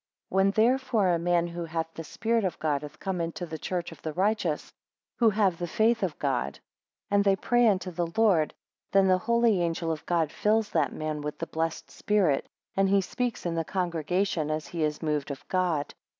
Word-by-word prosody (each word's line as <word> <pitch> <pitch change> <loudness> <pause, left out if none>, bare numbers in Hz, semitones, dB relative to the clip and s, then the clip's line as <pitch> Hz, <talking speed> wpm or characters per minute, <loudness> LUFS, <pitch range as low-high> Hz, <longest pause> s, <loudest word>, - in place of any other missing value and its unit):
7 - - -7
When 190 +1 +5
therefore 225 -1 +2
a 170 -1 +2
man 175 0 +2
who 170 0 -5
hath 165 0 -3
the 165 - -6
Spirit 225 +7 0
of 185 -3 -1
God 150 -3 0
hath 150 +1 -10
come 190 -3 -2
into 170 +1 -3
the 160 -2 -7
church 175 -2 -3
of 165 - -13
the 155 - -4
righteous, 190 -4 0 0.5
who 230 -2 +6
have 200 -5 +1
the 175 - -2
faith 225 +6 +2
of - - -1
God, - - -1 0.5
and 200 0 +4
they 195 -1 +4
pray 240 +4 +3
unto 185 -3 +1
the 175 0 -1
Lord; 190 -9 +3 0.4
then 195 -1 +5
the 185 -1 +4
holy 235 -2 +2
angel 165 -1 -1
of 155 -2 -4
God 165 -3 +1
fills 215 0 +1
that 150 -5 +1
man 155 -1 -3
with 150 0 -4
the 165 - -3
blessed 165 0 -3
Spirit, 195 -10 +1 0.3
and 195 0 +3
he 200 0 +4
speaks 245 +4 -3
in 170 - 0
the 165 0 0
congregation 175 0 -1
as 155 -1 -2
he 170 +2 -5
is 150 +1 -1
moved 150 -2 -1
of 140 -2 -7
God. 175 -6 0
175 Hz, 210 wpm, -28 LUFS, 160-200 Hz, 0.5 s, who